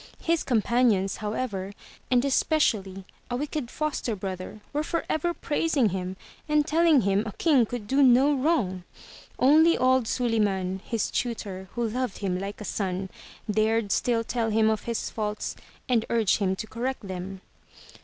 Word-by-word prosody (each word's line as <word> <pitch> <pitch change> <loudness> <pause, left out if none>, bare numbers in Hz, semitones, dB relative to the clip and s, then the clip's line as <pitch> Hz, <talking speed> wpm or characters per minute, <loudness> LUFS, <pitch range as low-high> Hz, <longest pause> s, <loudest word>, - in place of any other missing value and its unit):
His 335 0 +2
companions, 225 -5 +2
however, 210 -3 -3 0.4
and 250 +1 +3
especially 210 - +1 0.2
a 245 - -1
wicked 290 -1 -3
foster 300 -7 -2
brother 190 +1 -6
were 295 - +1
forever 330 +1 -1
praising 300 -7 +1
him 185 0 -4 0.3
and 300 0 +3
telling 325 -2 +4
him 200 0 +2
a 210 - -5
king 275 -9 +3
could 240 -3 -5
do 270 +7 +2
no 265 +2 +6
wrong. 255 - 0 0.5
Only 315 +5 +5
old 255 -2 +3
Suliman, 200 -7 0
his 230 -3 -2
tutor, 195 -6 -3
who 235 -1 0
loved 245 -1 -3
him 185 -3 -2
like 200 +1 -5
a 210 - -7
son, 190 -2 -3 0.4
dared 215 0 +1
still 230 +1 +1
tell 230 -1 -1
him 220 0 +3
of 215 - -3
his 235 -1 -3
faults 210 -1 -3 0.3
and 235 -3 +2
urge 225 -4 +2
him 190 -2 +1
to 205 - -5
correct 240 -1 -4
them. 185 +1 -6
225 Hz, 155 wpm, -26 LUFS, 195-260 Hz, 0.5 s, no